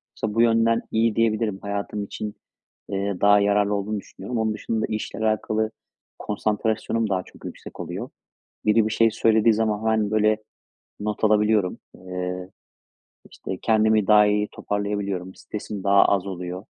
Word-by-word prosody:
Mesela 110 -1 -3
bu 115 - +4
yönden 115 0 +3
iyi 110 -1 +2
diyebilirim. 110 -3 +1
Hayatım 100 +1 -3
için, 105 +1 -6 0.5
eee, 100 -1 -2
daha 105 0 +6
yararlı 100 0 +2
olduğunu 100 +1 -2
düşünüyorum. 120 +4 -7
Onun 110 -1 +1
dışında 110 +1 -2
işle 110 -1 -4
alakalı 110 0 0 0.5
konsantrasyonum 110 +1 -1
daha 95 -2 0
çok - - -16
yüksek - - -9
oluyor. - - -5 0.6
Biri 105 +1 +4
bir 110 - -2
şey 115 0 +4
söylediği 110 0 +3
zaman 105 -1 0
hemen, 110 -2 +1
böyle, 110 0 +3 0.6
not 105 +1 -4
alabiliyorum. 105 -2 +3 0.2
Eee, 90 0 -5 0.8
işte, - - -6
kendimi 110 -2 +3
daha 105 -1 +7
iyi 105 0 +1
toparlayabiliyorum. 100 -3 -3
Stresim 105 -2 -7
daha 100 0 +5
az 100 -1 +1
oluyor. 90 +1 -6
105 Hz, 145 wpm, -24 LUFS, 100-110 Hz, 0.8 s, daha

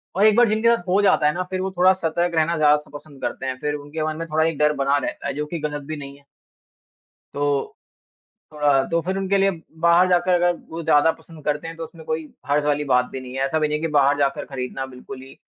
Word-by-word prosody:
और 200 +3 +4
एक 215 -1 +6
बार 240 -1 +5
जिनके 220 +2 +1
साथ 175 - -8
हो 195 +3 +3
जाता 190 -6 +4
है 150 - +2
ना, 185 - -2
फिर 185 0 -2
वो 190 0 -2
थोड़ा 185 +1 +6
सतर्क 170 -1 -1
रहना 160 +1 +1
ज़्यादा 150 -1 +5
स 150 - -10
पसंद 145 -2 -12
करते 135 - -4
हैं। 130 -1 -3
फिर 150 0 -2
उनके 145 +2 -5
मन 155 0 -3
में 165 0 -5
थोड़ा 160 0 +1
एक 165 -3 -1
डर 150 0 +3
बना 140 +1 +2
रहता 140 - -4
है, 140 - -2
जो 150 +1 -3
कि 165 +2 -5
गलत 145 -1 -4
भी 155 -1 -4
नहीं 140 -1 -9
है। 140 - -23 1.1
तो 145 -1 -1 0.8
थोड़ा 150 -1 -1
अ, - - -2
तो 170 0 +2
फिर 190 +3 -3
उनके 195 +1 +1
लिए 195 0 +3 0.3
बाहर 175 +2 +5
जाकर 175 0 +3
अब 175 - -4
वो 165 +1 -5
ज़्यादा 160 0 +4
पसंद 160 -2 -15
करते 150 +2 -1
हैं 165 - -7
तो 165 - -5
उसमें 160 0 -11
कोई 155 -1 -4
हर्ज़ 145 +1 +1
वाली 150 0 +1
बात 125 0 +4
भी 135 - -5
नहीं 125 0 -9
है। 135 - 0
ऐसा 155 +3 0
भी 155 - +1
नहीं 150 0 -1
है - - -8
कि 165 - 0
बाहर 140 0 +4
जाकर 140 -1 0
खरीदना 135 0 -5
बिल्कुल 130 0 -10
ही 135 0 -14
155 Hz, 265 wpm, -22 LUFS, 145-170 Hz, 1.1 s, एक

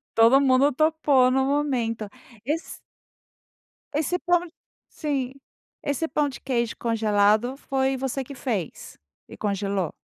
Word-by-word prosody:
Todo 230 +5 +6
mundo 275 +1 +4
topou 300 -3 +3
no 265 +1 +2
momento. 250 -7 -1 0.4
Esse 310 +5 -3 1.2
esse 315 +5 0
pã 350 -1 +2 0.5
sim. 275 -5 -3 0.5
Esse 285 +3 -1
pão 295 -1 +1
de 265 - -9
queijo 235 -3 -1
congelado 220 +2 +2
foi 265 -1 -1
você 270 0 -3
que 280 - -9
fez? 220 - -4 0.3
E - - -11
congelou? 200 -4 -2
265 Hz, 120 wpm, -25 LUFS, 230-285 Hz, 1.2 s, Todo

